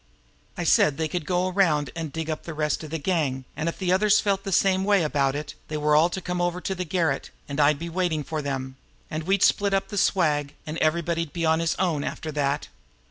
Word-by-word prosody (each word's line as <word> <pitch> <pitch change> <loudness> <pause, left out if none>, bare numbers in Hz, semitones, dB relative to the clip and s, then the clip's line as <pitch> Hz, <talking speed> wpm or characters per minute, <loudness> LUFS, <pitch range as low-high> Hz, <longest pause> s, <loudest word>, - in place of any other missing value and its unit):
I - - -2
said 145 -2 +4
they 160 - 0
could 155 -1 -4
go 180 0 +1
around 170 -7 +2
and 165 -3 -4
dig 160 +1 -4
up 155 -1 -3
the 165 - -7
rest 150 +1 -1
of 155 - -7
the 160 - -2
gang, 145 -6 -1
and 155 +3 -1
if - - -6
the 185 -2 -1
others 205 +2 +4
felt 195 -1 0
the 195 - -4
same 190 +1 +3
way 200 -3 +3
about 140 -3 +1
it, 145 0 -5
they 155 - -3
were 150 0 +2
all 160 +3 +5
to 185 - -4
come 180 -1 -3
over 175 0 0
to 190 - -3
the 180 -1 -3
garret, 160 -5 0 0.2
and 140 +1 -4
I'd 145 0 +4
be 170 +3 -5
waiting 170 -3 -1
for 155 +1 -3
them, 135 -2 -4 0.3
and 155 0 -3
we'd 195 +1 +2
split 200 -1 +3
up 195 - -1
the 205 - -1
swag, 150 -7 +1
and 155 +2 -4
everybody'd 165 0 0
be 170 -1 -1
on 160 0 +3
his 165 -1 0
own 170 -6 0
after 155 - -4
that." 145 0 -1
160 Hz, 245 wpm, -25 LUFS, 150-180 Hz, 0.3 s, all